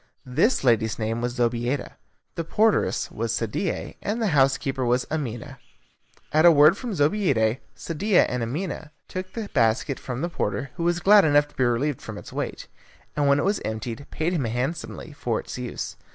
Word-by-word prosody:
This 130 - +2
lady's 115 -3 +2
name 115 +1 -2
was 120 0 -2
Zobeida, 120 +2 0 0.4
the 165 - -3
porteress 215 +7 +1
was - - -2
Sadie, - - -3
and 215 +3 -2
the 220 -3 +1
housekeeper 135 -1 +2
was 125 +1 +1
Amina. 135 -3 -4 0.7
At 155 +1 +4
a 175 - +9
word 155 +3 +6
from 235 -2 -5
Zobeida, 140 - +2 0.2
Sadie 185 +5 0
and 125 0 +3
Amina 155 +6 -4 0.2
took 185 0 -6
the 225 -3 -4
basket 120 +2 +1
from 125 0 -5
the 170 - 0
porter, 135 -5 -3
who 170 - -4
was 175 0 +1
glad 205 +1 +7
enough 145 -1 +4
to - - -24
be 130 - +2
relieved 120 +3 0
from - - -7
its - - -10
weight; - - -4 0.5
and 145 -1 +1
when 140 0 +5
it 145 - 0
was 200 +1 +1
emptied, 110 +4 -5
paid 165 +3 -1
him 150 -8 0
handsomely 135 +6 -4
for 120 -5 -2
its - - -7
use. 125 -1 -5
140 Hz, 180 wpm, -25 LUFS, 120-170 Hz, 0.7 s, a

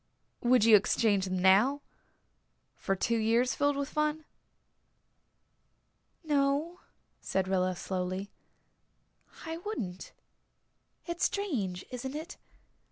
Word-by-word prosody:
"Would 245 -2 +4
you 225 -2 +8
exchange 205 -1 +2
them 185 0 -2
now 205 +10 +4 0.9
for 195 - -1
two 230 +4 0
years 230 +3 +2
filled 285 0 +1
with 280 0 -2
fun?" 305 0 -1 2.0
"No," 295 +3 0 0.4
said 190 -1 -1
Rilla 185 -1 +1
slowly. 185 +2 -4 1.1
"I 325 0 -4
wouldn't. 230 - -6 0.9
It's 340 0 -1
strange 220 - -2
isn't 260 +2 -5
it? 320 +5 -7
240 Hz, 100 wpm, -30 LUFS, 190-300 Hz, 2.0 s, you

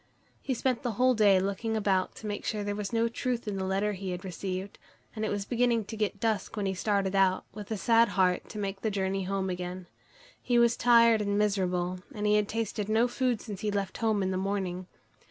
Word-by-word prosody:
He 260 - -2
spent 255 0 0
the 245 -4 -2
whole 255 +4 +3
day 205 -4 +5
looking 200 +4 -1
about 195 -3 +1
to - - -10
make 205 -1 -4
sure 210 -2 -2
there 205 0 -2
was 205 -1 -4
no 230 0 +2
truth 235 0 -3
in 205 - -2
the 190 - -2
letter 195 +2 0
he 190 -1 -5
had 180 +1 -5
received, 190 +1 -5 0.4
and 220 - -3
it 215 - 0
was 205 -1 -2
beginning 235 -1 +1
to 220 - -7
get 210 -1 -2
dusk 220 0 -1
when 205 - -1
he 190 - 0
started 200 0 0
out, 190 -1 +3
with 205 -1 -8
a 220 - -2
sad 230 +3 +4
heart, 180 -1 +2
to - - -8
make 195 -1 -3
the 220 - 0
journey 195 -1 -1
home 195 0 -1
again. 180 0 -4 0.6
He 245 -1 +1
was 235 0 +4
tired 230 -2 +5
and 200 -1 0
miserable, 185 -3 0 0.2
and 210 0 -3
he 210 - +4
had 210 -1 +3
tasted 215 -2 -2
no 225 +3 +3
food 245 -2 0
since 205 -4 -7
he 215 - -1
left 200 -2 -2
home 220 -3 +1
in 190 - 0
the 185 - -1
morning. 185 -2 -2
205 Hz, 230 wpm, -29 LUFS, 190-225 Hz, 0.6 s, day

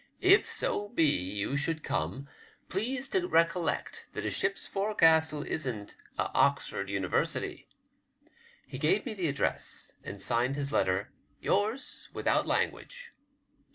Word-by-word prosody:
If 385 +3 +6
so 205 0 -1
be 185 -9 +3
you 100 -1 0
should 155 +2 -1
come, 95 - -2 0.4
please 250 +7 -1
to 370 -2 +1
recollect 165 - +1
that - - -4
a - - 0
ship's 195 - -1
forecastle 160 -7 +3
isn't 120 -11 -4 0.2
a - - -1
Oxford 100 0 +1
University." 100 -2 -1 1.0
He 130 - -8
gave 160 +8 +2
me - - -3
the 185 -5 -1
address, 140 -1 -1
and 100 - -7
signed 120 +6 +1
his 140 -1 -2
letter, 95 +1 +1
'^ - - -38
Yours, 215 +7 -1
without - - +1
language." - - -2
160 Hz, 130 wpm, -30 LUFS, -, 1.0 s, If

